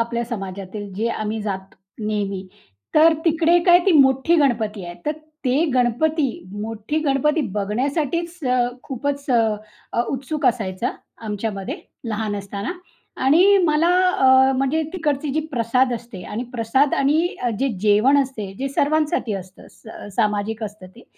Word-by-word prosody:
आपल्या 235 +1 -1
समाजातील 200 -2 -6
जे 225 +4 -1
आम्ही 215 -1 -3
जातो 195 -2 -5 0.3
नेहमी. 200 -3 -2 0.5
तर 320 +1 +7
तिकडे 330 +1 +4
काय 350 0 +8
ती 380 - +5
मोठी 270 +2 +4
गणपती 220 - +1
आहे. 175 - -7
तर 300 - +2 0.3
ते 270 +6 +2
गणपती 270 +5 +2 0.3
मोठी 225 +7 -3
गणपती 300 +1 +1 0.2
बघण्यासाठीच 285 - -1
अ, 250 0 +2 0.2
खूपच 280 +2 -3
अ, 220 -1 -1
उत्सुक 280 +3 -2
असायचा 220 -3 0 0.4
आमच्यामध्ये 205 -2 -4 0.3
लहान 210 -1 -2
असताना 200 - -4 0.5
आणि 370 +8 +6
मला 310 +2 +3 0.3
अ, 265 0 +6
म्हणजे 275 +4 +1
तिकडची 300 -5 -1
जी 315 - +1
प्रसाद 250 +2 +2
असते 230 -5 -8
आणि 220 +3 -4
प्रसाद 250 +5 +2
आणि 300 +5 +2 0.2
अ, 245 - +1
जे 275 - +1
जेवण 215 +7 +4
असते. 220 -8 -6
जे 275 +1 -2
सर्वांसाठी 295 - 0
असतं 185 0 -9
असं 220 -2 -12
स 195 - -13
सामाजिक 215 0 0
असतं 210 -3 -9
ते. 240 - -14
245 Hz, 140 wpm, -21 LUFS, 210-290 Hz, 0.5 s, काय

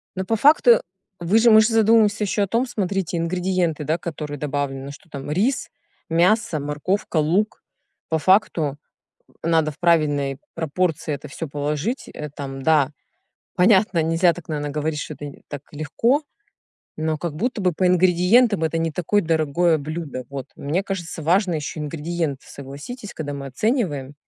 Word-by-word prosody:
Но 190 0 -3
по 225 - +1
факту 245 -2 +6 0.4
вы 180 +6 +3
же 230 +1 +6
можете 220 +1 +6
задумываться 220 -1 +4
еще 205 +1 0
о 200 - -1
том, 230 +5 +1
смотрите, 195 -5 -2
ингредиенты, 175 -2 0
да, 160 +3 0
которые 150 -3 -6
добавлены: 140 -1 -3
что 145 +3 -15
там 140 0 -6
рис, 225 - 0 0.4
мясо, 175 0 +2
морковка, 150 +6 -2
лук. 175 +8 +1 0.5
По 160 -1 +1
факту 160 -6 +2 0.7
надо 160 -2 +2
в - - -18
правильной 145 -5 +2 0.2
пропорции 160 0 -1
это 145 +1 -6
всё 160 +3 -5
положить, 150 - -3
э, 150 0 -6
там, 135 -2 -7
да. 150 -3 +3 0.6
Понятно, 190 -2 +4
нельзя 165 +2 +3
так, 175 - -11
наверно, 145 -1 -2
говорить, 150 +1 -2
что 155 - -5
это, 145 - -8
э, 145 - -10
так 145 -2 -6
легко, 230 - 0 0.7
но 155 0 -1
как 165 -1 -4
будто 235 +6 -2
бы 180 -2 +2
по 180 +3 +1
ингредиентам 180 +3 +4
это 160 +1 -1
не 165 0 0
такое 180 +6 +1
дорогое 160 +1 +2
блюдо. 150 -4 -5
Вот, 135 -2 -5
мне 160 +7 -1
кажется, 180 -4 -5
важно 180 +3 +2
еще 155 0 -4
ингредиенты, 150 -1 -3
согласитесь, 145 - -9
когда 145 -2 -4
мы 140 -1 -6
оцениваем. 145 - -1
165 Hz, 160 wpm, -22 LUFS, 145-190 Hz, 0.7 s, факту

